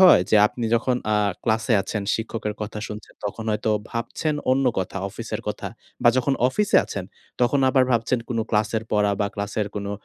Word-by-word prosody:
হয়? 180 - +8
যে 110 - +6
আপনি 120 +2 -5
যখন 125 +2 +1 0.2
আ - - +3 0.3
ক্লাসে 110 +2 +1
আছেন, 100 +1 -3
শিক্ষকের 110 -1 -3
কথা 105 0 -5
শুনছেন, 105 0 -9
তখন 105 +2 -4
হয়তো 110 +1 0 0.2
ভাবছেন 120 +6 -2 0.2
অন্য 135 +1 +3
কথা, 95 +1 -3
অফিসের - - -5
কথা - - -4 0.3
বা, 120 - +6
যখন 130 +2 +2
অফিসে 205 +9 +2
আছেন, 95 -3 -5 0.4
তখন 125 +3 +3
আবার 130 -1 +4
ভাবছেন 120 +1 +2
কোন 120 - -2
ক্লাসের 110 +1 +1
পড়া 105 -1 +3
বা, 100 - +2
ক্লাসের 100 0 -2
কোনো 100 -1 -3
110 Hz, 180 wpm, -24 LUFS, 105-125 Hz, 0.4 s, হয়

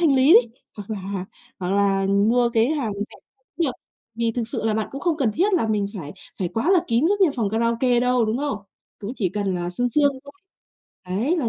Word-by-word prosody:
thanh 310 -5 +4
lý 265 +4 +5
đấy, 235 0 +6 0.3
hoặc 205 0 -9
là 195 -2 -4 0.3
hoặc 180 -1 -3
là 195 -1 +2
mua 220 +5 +3
cái 225 0 +3
hàng 275 -9 -1
rẻ 205 +1 -6 0.5
được. 275 - +1 0.4
Vì 230 0 0
thực 235 0 -2
sự 225 - -4
là 220 - +1
bạn 220 0 -1
cũng 275 - -7
không 340 -1 0
cần 265 -7 +1
thiết 380 - +1
là 335 -11 +2
mình 210 -2 +1
phải 145 -3 -7 0.3
phải 180 -3 -1
quá 250 - 0
là 370 - +5
kín 235 +4 +2
giống 410 +1 +1
như 365 - +5
phòng 220 -4 0
karaoke 235 +2 +1
đâu, 250 -1 +2
đúng 220 +3 -1
không? 285 -6 -2 0.4
Cũng 210 +4 -5
chỉ 200 -8 0
cần 200 0 -2
là 175 0 -3
sương 245 +7 -1
sương 285 +3 +3
thôi. 285 - -12 0.8
Đấy, 230 - 0
là 260 -9 0
230 Hz, 230 wpm, -23 LUFS, 200-270 Hz, 0.8 s, đấy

